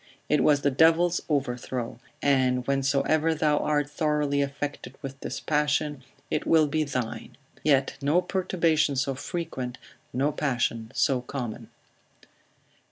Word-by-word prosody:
It 150 -1 +3
was 145 -1 +4
the 140 - +3
devil's 165 +4 +4
overthrow; 125 -4 -2 0.2
and 130 -3 +2
whensoever 140 +4 +2
thou 150 -2 +2
art 145 -1 +1
thoroughly 150 -1 0
affected 140 +1 -4
with 135 0 -7
this - - -5
passion, 150 -2 0 0.3
it - - -1
will 160 -2 +5
be 155 +2 0
thine. 130 -5 -4 0.3
Yet 135 -3 +2
no 145 +5 +3
perturbation 170 -5 +1
so 135 +1 0
frequent, 130 -4 -5 0.3
no 140 +4 +1
passion 120 -6 -1
so 130 -3 +2
common. 125 -3 -6
145 Hz, 125 wpm, -27 LUFS, 130-155 Hz, 0.3 s, will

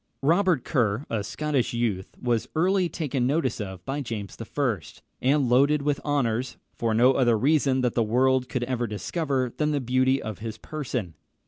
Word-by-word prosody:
Robert 170 -1 +3
Kerr, 120 -1 0
a 110 -3 -1
Scottish 145 +3 -1
youth, 105 -6 -1
was 120 -3 0
early 180 +2 +2
taken 140 -6 -1
notice 135 -5 0
of 95 -3 -7
by 140 +2 -2
James 110 -6 -5
I., 120 -2 -1 0.4
and 135 +1 +3
loaded 140 +4 +3
with 145 -1 0
honours, 130 -4 -1 0.2
for 115 -2 -1
no 125 +4 +5
other 120 -4 +3
reason 135 +1 +2
that 125 -2 +1
the 120 - +1
world 125 +3 +2
could 125 - -2
ever 120 -1 -1
discover 130 - -2
than 150 0 0
the 145 - +1
beauty 130 +1 +2
of 110 -3 -6
his 110 0 -6
person. 125 - -4
130 Hz, 175 wpm, -26 LUFS, 115-145 Hz, 0.4 s, no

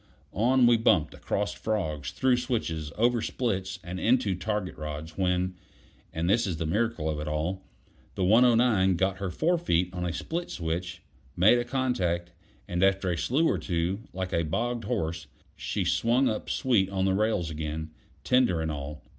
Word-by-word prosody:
On 125 +5 +3
we 120 -1 +6
bumped, 95 -9 +2
across 105 0 -2
frogs, 80 - -2
through 130 -1 +2
switches, 85 - -2
over 120 +1 +2
splits, 95 -7 -2
and 90 0 -5
into 115 -3 +2
target 105 0 -3
rods, 75 +1 -6
when 90 0 0 0.6
and 80 +1 -2
this 105 +3 +3
is 90 -4 -2
the 80 - -2
miracle 105 -1 0
of 75 -1 -2
it 75 - -5
all 80 +5 -2 0.5
the 95 - -1
109 115 -3 +4
got 95 +2 0
her 100 -1 -2
forefeet 95 - +1
on 90 -1 -4
a 90 - -1
split 170 - -4
switch, 85 +1 -4 0.3
made 105 +7 +6
a - - 0
contact, 95 -10 -1 0.4
and 90 +1 -1
after 95 -1 +2
a - - 0
slew 145 - +1
or - - +1
two, 85 +2 -1
like 90 0 -4
a 85 - +2
bogged 115 +8 -2
horse, 80 -4 -2 0.3
she - - -2
swung 125 +3 +2
up 110 - -2
sweet 110 -8 +2
on 95 -1 -1
the 95 - +2
rails 100 -5 0
again, 80 0 -4 0.3
tender 125 -10 +3
and 80 -1 -1
all. 75 +1 -6
95 Hz, 170 wpm, -28 LUFS, 85-115 Hz, 0.6 s, we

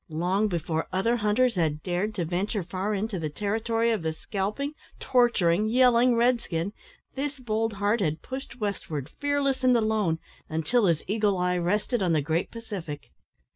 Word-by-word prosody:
Long 180 +7 +1
before 165 -3 -2
other 230 +6 +1
hunters 230 +3 +2
had 155 -4 0
dared 185 +4 -1
to 175 - -1
venture 185 +4 -1
far 190 +4 -2
into 205 -1 -2
the 155 -2 -2
territory 225 +6 0
of 220 -5 0
the 160 -1 -1
scalping, 210 - -3 0.3
torturing, 215 -6 +3
yelling 245 0 +5
red 240 +1 +3
skin, 170 +4 -3 0.4
this 285 +1 -3
bold 225 -3 -1
heart 205 +3 +1
had 155 -3 -1
pushed 260 -1 -7
westward, 160 - -3
fearless 285 -2 0
and 250 -1 +5
alone, 215 -7 +1 0.3
until 195 +8 +2
his 165 -3 +1
eagle 210 -1 +1
eye 180 0 +1
rested 210 +6 0
on 180 -3 +2
the 155 - +3
great 160 +4 0
Pacific. 195 -10 -7
205 Hz, 165 wpm, -27 LUFS, 175-235 Hz, 0.4 s, yelling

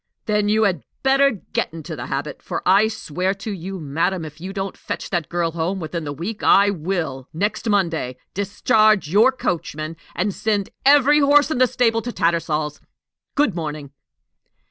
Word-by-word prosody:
"Then 210 -1 +1
you 220 +1 +3
had 185 -8 +1 0.2
better 275 +1 +5
get 220 -8 -3
into 160 0 -7
the 125 -3 -6
habit; 140 +2 -4
for - - -4
I 200 +4 +5
swear 190 -3 -2
to 200 +3 -6
you, 190 0 -6
madam, 165 +4 -1
if 155 +1 -11
you 185 +2 -5
don't 195 -1 -4
fetch - - -6
that 175 -5 -1
girl 170 -1 0
home 170 +4 -2
within 165 -1 -4
the 145 - -3
week, 175 +10 -5
I 200 +1 +5
will, 160 -7 -3
next 210 +6 -1
Monday, 165 -11 0 0.2
discharge 205 -1 +2
your 220 +7 +5
coachman, 165 - -3 0.2
and 190 +3 0
send 205 -2 -1 0.2
every 290 +1 +6
horse 290 +1 +4
in 255 - 0
the 255 - +5
stable 230 -1 +1
to 245 - -4
Tattersall's! 155 -5 -1 0.5
Good 285 -8 +2
morning." 150 -4 -5
190 Hz, 170 wpm, -21 LUFS, 160-215 Hz, 0.5 s, every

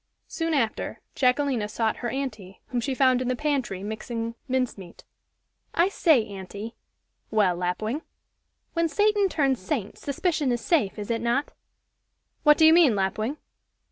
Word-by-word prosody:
Soon 330 -1 -1
after, 230 -6 -1
Jacquelina 255 -4 +1
sought 220 0 -1
her 240 - -3
aunty, 225 -9 -5
whom 245 -1 -1
she 265 +2 -2
found 255 -1 +4
in 255 - -2
the 255 - +1
pantry, 260 -9 -1
mixing 225 +2 -4
mince 255 -2 0
meat. 180 -3 -12 0.7
"I 345 +3 +4
say, 315 - +3
aunty 200 +2 -8 0.3
" - - -49
"Well, 185 -4 +4
Lapwing?" 215 - -2 0.7
"When 335 -1 +1
Satan 415 +2 +2
turns 275 -7 +1
saint, 210 0 -3
suspicion 290 -1 0
is 240 - 0
safe, 225 - +1
is 210 +1 -4
it 230 -1 -1
not?" 240 +5 0 0.9
"What 300 -1 +6
do 320 - +6
you 315 - +8
mean, 325 -10 +6
Lapwing?" 215 +8 -1
250 Hz, 155 wpm, -26 LUFS, 215-295 Hz, 0.9 s, you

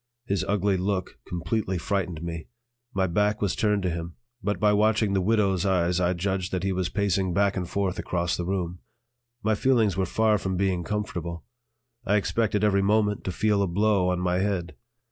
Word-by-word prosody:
His 100 -5 0
ugly 100 -1 +1
look 95 0 -2
completely 90 +3 -2
frightened 90 -3 -2
me. 85 -2 -5 0.4
My 95 -1 +1
back 105 +4 +1
was 100 -3 0
turned 105 -3 +1
to 90 - 0
him, 85 0 -5 0.3
but 105 +1 -1
by 105 -1 +4
watching 105 0 +2
the 95 - +2
"widow's" 100 -2 +2
eyes 90 -2 +2
I 90 0 +2
judged 95 0 -2
that 90 -1 -1
he 95 - 0
was 90 -2 -1
pacing 95 -3 0
back 100 -1 +2
and 90 -3 -3
forth 100 -2 -1
across 85 -1 -1
the 90 - -3
room. 90 -2 -2 0.6
My 110 +1 +2
feelings 110 -4 +2
were 95 -1 +1
far 110 +2 +2
from 95 -1 -2
being 95 -2 0
comfortable; 85 -4 -4 0.6
I 105 -3 +2
expected 105 0 +1
every 100 -2 +3
moment 105 0 +2
to 95 - -1
feel 105 +1 +1
a 100 - +2
blow 100 0 +2
on 90 -1 0
my 90 0 +1
head. 95 -3 -1
95 Hz, 190 wpm, -26 LUFS, 90-105 Hz, 0.6 s, by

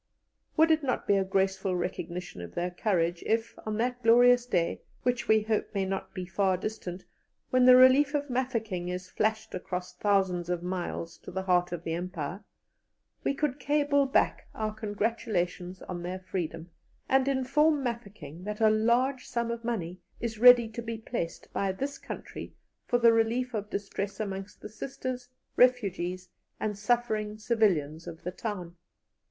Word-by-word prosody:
Would 320 +1 +6
it 315 0 +4
not 265 -4 -1
be 200 - +4
a 195 - +3
graceful 190 0 0
recognition 175 - -4
of 85 -1 -9
their 180 +1 -1
courage 175 -3 0
if, 225 +1 0
on 215 -1 -1
that 245 +2 -1
glorious 245 +1 +6
day, 175 -8 0 0.2
which 245 -1 0
we 220 -1 +4
hope 215 0 -1
may 195 -1 +1
not 195 +1 -4
be 185 -1 -4
far 190 0 +1
distant, 185 -2 -5 0.5
when 255 -1 +5
the 255 0 +9
relief 265 +3 +6
of 290 0 -1
Mafeking 230 -9 -2
is 180 0 -5
flashed 220 0 -1
across 180 0 -4
thousands 190 -4 +1
of 175 -1 -1
miles 175 -2 -4
to - - -11
the 190 +1 -3
'heart 180 -1 +2
of 175 -1 -4
the 165 - -2
Empire,' 175 +1 -4 0.8
we 275 - 0
could 295 -1 -1
cable 285 0 +2
back 270 - +1
our 215 -1 -2
congratulations 205 -4 -2
on 175 -1 -5
their 180 +2 -4
freedom, 175 -3 -5 0.4
and 265 0 +3
inform 275 +3 +2
Mafeking 200 - -6
that 210 0 -4
a 220 -1 +5
large 240 +4 +2
sum 235 -1 -1
of 235 0 -5
money 185 -7 -3 0.2
is 225 -2 -4
ready 245 -1 +8
to 225 +2 -6
be 230 -1 -4
placed 220 -6 -5
by 195 -1 0
this 275 +8 -4
country - - -8 0.3
for 245 - +3
the 235 -1 +6
relief 235 +3 +1
of 210 -1 -3
distress 200 0 -4
amongst 195 -2 -5
the 210 - -7
Sisters, 250 +2 -5 0.3
refugees, 195 -8 +2 0.3
and 210 -1 -1
suffering 215 -1 0
civilians 180 -9 +1
of 165 - -8
the 180 - -3
town? 180 -4 -5
210 Hz, 165 wpm, -29 LUFS, 180-245 Hz, 0.8 s, the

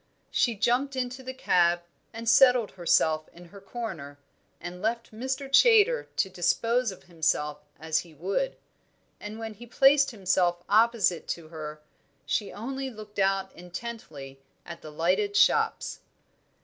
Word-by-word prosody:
She 235 -2 +2
jumped 255 +6 +1
into 255 0 -3
the 260 0 -6
cab 175 -9 +2 0.3
and 230 +1 -8
settled 250 -2 +5
herself 160 -3 +1
in 175 0 -14
her 200 - -11
corner, 190 -10 -7 0.4
and 175 +1 -8
left 230 +1 -2
Mr. 260 +5 -4
Chaytor 455 - +5
to - - +1
dispose 230 +6 0
of 190 - -13
himself 150 -3 -1 0.2
as 160 0 0
he 165 -3 -11
would; 195 - -2 0.6
and 210 +1 -7
when 225 -1 -6
he 240 +3 -13
placed 275 +3 +5
himself 185 -5 0
opposite 215 -5 +3
to 165 -2 -5
her, 155 -2 -7 0.4
she 145 +9 -1
only 265 +5 -5
looked 215 -3 -10
out 195 0 +1
intently 175 - -8 0.3
at 170 -1 -9
the 155 - -9
lighted 185 +6 0
shops. - - +2
205 Hz, 140 wpm, -27 LUFS, 170-240 Hz, 0.6 s, settled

